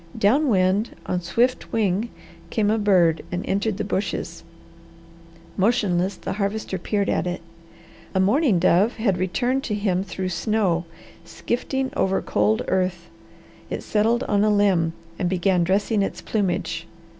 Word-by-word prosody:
Down 260 +8 +3
wind 195 +1 +2
on 180 - -1
swift 240 +9 0
wing 215 +1 0 0.4
came 210 -2 +1
a 220 - +1
bird 180 -6 +3
and 180 +1 -3
entered 200 +1 -1
the - - -2
bushes. 200 0 -3 1.1
Motionless 195 -3 +1
the - - -5
Harvester 200 -1 -2
peered 200 +2 -1
at - - 0
it. 180 +1 -3 0.8
A - - +3
mourning 215 - +3
dove 185 +6 +3
had 200 -5 0
returned 245 +9 0
to 210 - -1
him 195 -3 0
through 190 -1 -4
snow, 180 -1 0 0.4
skifting 260 +8 -3
over 190 0 +1
cold 105 +1 +1
earth. 180 -2 -1 0.6
It - - -4
settled 225 +4 +1
on 205 -4 +1
a 215 - +3
limb 195 -6 +2 0.3
and 180 - 0
began 185 -1 +2
dressing 200 +4 +1
its 195 - -2
plumage. 175 -5 -2
195 Hz, 145 wpm, -23 LUFS, 180-215 Hz, 1.1 s, Down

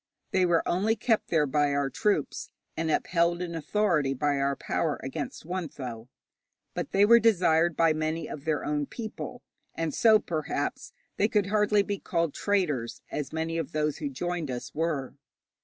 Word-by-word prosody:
They 185 -1 +3
were 170 -1 +2
only 205 +6 +2
kept 220 0 +1
there 160 -3 +2
by 145 +1 +1
our 140 -1 0
troops, 205 -9 -1 0.3
and 160 0 -1
upheld 170 +2 +1
in 175 -1 -4
authority 165 -4 +1
by 145 +2 +1
our 140 0 +1
power 155 +1 -1
against 140 +2 -5
Wuntho. 135 -10 -5 0.7
But - - -4
they 200 +1 +5
were 235 +2 +7
desired 175 -7 +3
by 165 -1 +4
many 155 +1 -2
of 140 - -7
their 155 -2 -1
own 145 -1 -1
people, 235 +1 -7 0.3
and 165 -2 -2
so, 220 -2 +6
perhaps, 160 -7 -3 0.3
they 205 - +3
could 210 -3 +2
hardly 210 -1 +4
be 200 -1 -3
called 165 -4 -1
traitors, 155 - -1
as 145 -2 -3
many 160 +1 -2
of 165 - -5
those 150 -1 0
who 290 - -2
joined 175 - -3
us 125 -1 -5
were. 155 -4 -1
165 Hz, 170 wpm, -28 LUFS, 150-195 Hz, 0.7 s, were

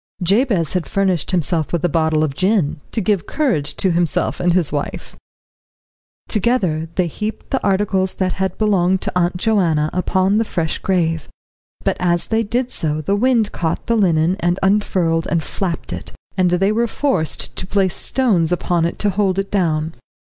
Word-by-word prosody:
Jabez 195 - +2
had 180 -3 -1
furnished 190 -6 0
himself 170 -3 +1
with 170 0 0
a - - +4
bottle 160 -1 +1
of 150 -3 -1
gin, 180 -3 +1
to 225 - -1
give 195 -3 0
courage 240 - 0
to 190 - +1
himself 170 -1 0
and 175 - +2
his 170 -3 +3
wife. 145 -1 -4 1.1
Together 185 -8 0
they 185 - +2
heaped 210 +6 -5
the 265 - 0
articles 190 -1 +1
that 185 -1 -1
had 190 0 -2
belonged 190 -3 +2
to - - -2
Aunt 180 0 +1
Joanna 175 -7 +1
upon 190 +3 +1
the - - +2
fresh 165 -7 -2
grave, 165 -5 0 0.6
but - - 0
as 175 -1 +1
they 225 0 +2
did 240 +3 -1
so 155 -1 -1
the 195 +6 0
wind 230 -1 +2
caught 165 -2 -2
the 230 - +1
linen 175 -3 +2
and 175 -2 +1
unfurled 185 -5 +1
and 170 -2 0
flapped 175 +1 -4
it, - - -7 0.2
and 185 -2 +2
they 185 +3 +2
were 235 +2 +1
forced 215 - -1
to 185 - -5
place 195 -2 +1
stones 195 -11 +1
upon 175 -1 +1
it 170 - -3
to 205 - 0
hold 195 -1 0
it 195 0 -2
down. 160 -5 0
185 Hz, 175 wpm, -19 LUFS, 165-205 Hz, 1.1 s, a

